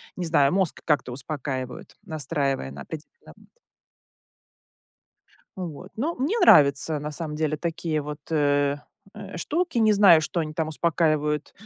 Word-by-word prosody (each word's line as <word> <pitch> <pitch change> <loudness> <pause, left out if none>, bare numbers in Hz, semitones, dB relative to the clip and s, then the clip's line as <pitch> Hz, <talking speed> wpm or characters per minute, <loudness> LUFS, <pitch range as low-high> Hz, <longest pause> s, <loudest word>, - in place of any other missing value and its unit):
не 180 - -4
знаю, 145 -4 +3
мозг 190 -3 0
как-то 145 -5 +1
успокаивают, 130 -1 -6
настраивая 145 - -2
на 70 0 -9
определенный 160 - -11 2.1
Вот, 180 -1 -7
ну, 300 +9 -1
мне 315 - 0
нравятся 150 - +5
на 150 +1 -4
самом 150 0 -5
деле 155 -1 -1
такие 165 -1 -2
вот, 150 +1 -7
э, 145 -2 +2 0.4
э, 200 -3 -9
штуки, 325 - -1
не 220 -2 +4
знаю, 195 -6 +7
что 165 +2 -2
они 155 -1 -4
там 160 0 -2
успокаивают, 155 -2 0
155 Hz, 135 wpm, -25 LUFS, 145-180 Hz, 2.1 s, знаю